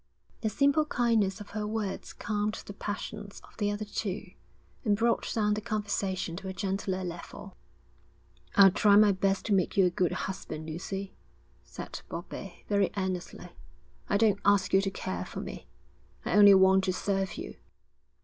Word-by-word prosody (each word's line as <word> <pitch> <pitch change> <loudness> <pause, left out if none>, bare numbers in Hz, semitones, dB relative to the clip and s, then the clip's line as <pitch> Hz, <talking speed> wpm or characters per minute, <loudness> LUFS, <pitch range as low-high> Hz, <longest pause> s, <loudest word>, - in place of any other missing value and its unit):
The 220 - -1
simple 285 +6 +3
kindness 225 -8 +1
of 205 - -10
her 210 0 -3
words 210 -2 -3
calmed 210 0 -2
the 200 - -8
passions 205 0 -6
of - - -18
the 205 -2 0
other 205 +1 -3
two, 205 -1 -4 0.5
and 210 -4 +2
brought 235 +1 +1
down 210 -2 +1
the 210 - -2
conversation 200 -5 -2
to 195 - -7
a 190 - -4
gentler 190 -1 -2
level. 170 - -8 1.0
'I'll 195 -2 +8
try 200 +2 +4
my 210 0 +7
best 195 0 0
to 210 - +1
make 190 +2 +1
you 190 - +6
a 180 - +2
good 175 0 +1
husband, 160 -4 -5
Lucy,' 190 +4 -5 0.5
said - - -8
Bobbie, 175 +2 -8
very 200 -2 +2
earnestly. 185 -2 -4 0.6
'I 200 - +3
don't 210 -2 +3
ask 200 -2 +3
you 195 - +6
to 195 - -1
care - - -4
for - - -7
me; - - -7 0.6
I - - -1
only 205 -1 +9
want 190 0 +5
to 185 - +1
serve 195 0 -1
you.' 355 +5 -7
200 Hz, 170 wpm, -29 LUFS, 190-210 Hz, 1.0 s, only